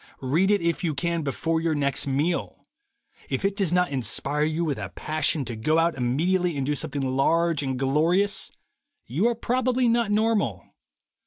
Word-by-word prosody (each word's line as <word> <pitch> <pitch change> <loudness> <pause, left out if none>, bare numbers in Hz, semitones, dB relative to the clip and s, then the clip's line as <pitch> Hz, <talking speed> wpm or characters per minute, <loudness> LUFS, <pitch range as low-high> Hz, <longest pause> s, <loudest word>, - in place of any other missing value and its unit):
Read 160 +9 +2
it, 205 -2 +3
if 170 +2 0
you 160 -4 -1
can, 170 +3 -1
before 160 +3 -1
your 165 -1 0
next 140 -1 -1
meal. 145 +6 -1 0.6
If - - -2
it 195 0 +1
does 195 -5 0
not 180 -1 +2
inspire 140 +2 -1
you 160 +2 -1
with 145 -7 -2
a 100 -3 -5
passion 155 - 0
to 120 0 -5
go 155 +9 +1
out 165 +1 +3
immediately 165 +7 0
and 135 - -1
do 150 - 0
something 145 -1 -3
large 150 +5 +2
and 130 -2 -2
glorious, 160 +9 +1 0.5
you 170 - +1
are 240 - +1
probably 250 +1 +1
not 235 -2 +2
normal. 215 0 +1
160 Hz, 175 wpm, -25 LUFS, 140-185 Hz, 0.6 s, it